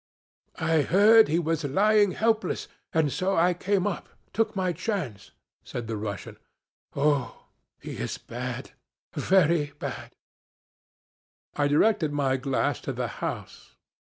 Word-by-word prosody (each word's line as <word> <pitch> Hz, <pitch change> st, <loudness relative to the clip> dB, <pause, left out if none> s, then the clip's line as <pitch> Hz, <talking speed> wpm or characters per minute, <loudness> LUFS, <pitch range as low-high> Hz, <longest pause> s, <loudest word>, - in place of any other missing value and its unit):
'I 160 Hz, -1 st, +2 dB
heard 215 Hz, +5 st, +7 dB
he 160 Hz, -, +1 dB
was 165 Hz, -2 st, -1 dB
lying 205 Hz, +6 st, +3 dB
helpless, 220 Hz, -4 st, 0 dB, 0.2 s
and 155 Hz, -3 st, +2 dB
so 190 Hz, +3 st, 0 dB
I 175 Hz, +2 st, +4 dB
came 190 Hz, +2 st, 0 dB
up 205 Hz, -4 st, -3 dB, 0.2 s
took 225 Hz, -2 st, 0 dB
my 185 Hz, -2 st, 0 dB
chance,' 165 Hz, -, -4 dB, 0.3 s
said 120 Hz, -, -6 dB
the 110 Hz, 0 st, -4 dB
Russian. 105 Hz, -1 st, -5 dB, 0.6 s
'Oh, 140 Hz, -2 st, 0 dB, 0.3 s
he -, -, -7 dB
is -, -, -3 dB
bad, -, -, -6 dB, 0.4 s
very 165 Hz, -6 st, +2 dB
bad.' -, -, -6 dB, 1.4 s
I 145 Hz, -1 st, +1 dB
directed 155 Hz, +1 st, +3 dB
my 140 Hz, -2 st, +1 dB
glass 135 Hz, 0 st, -1 dB
to -, -, -4 dB
the -, -, -2 dB
house. -, -, -6 dB
165 Hz, 130 wpm, -27 LUFS, 145-195 Hz, 1.4 s, heard